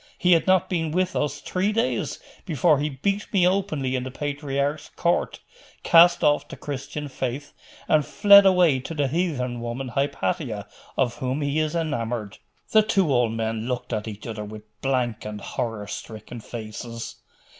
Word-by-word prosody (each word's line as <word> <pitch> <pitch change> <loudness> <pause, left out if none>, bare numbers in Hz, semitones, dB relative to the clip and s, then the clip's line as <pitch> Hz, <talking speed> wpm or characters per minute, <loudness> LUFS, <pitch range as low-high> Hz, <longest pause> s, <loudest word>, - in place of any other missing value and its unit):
He 180 -2 +2
had 165 +1 +4
not 185 -1 +4
been 165 -3 -1
with 185 +2 0
us 145 -1 -1
three 190 +3 0
days 230 +3 -1 0.3
before 155 -3 +2
he 150 +1 0
beat 200 +9 -2
me 180 -3 +4
openly 155 -9 0
in 130 - -1
the 130 - -5
patriarch's 145 +1 -2
court, 170 0 0 0.4
cast 170 +1 +6
off 145 0 +3
the - - -9
Christian 145 +1 -5
faith, 130 +1 -4 0.3
and 155 -1 +4
fled 200 +6 +7
away 180 -7 +4
to 150 +6 -7
the 145 -2 +1
heathen 130 -6 -1
woman, 120 +2 -4
Hypatia, 135 - -2 0.3
of 125 -3 +1
whom 130 +3 -2
he 145 +1 0
is 155 +1 -1
enamoured.' 120 -10 -2 0.3
The 215 - +7
two 195 -8 +2
old 120 -3 +2
men 115 0 -2
looked 125 -1 -3
at 110 0 -2
each 105 -1 -7
other 110 -2 -5
with 105 0 -9 0.2
blank 125 -4 0
and 105 -1 -6
horror 110 0 -4
stricken 110 +3 -8
faces. 115 +1 -7
140 Hz, 165 wpm, -24 LUFS, 120-165 Hz, 0.4 s, fled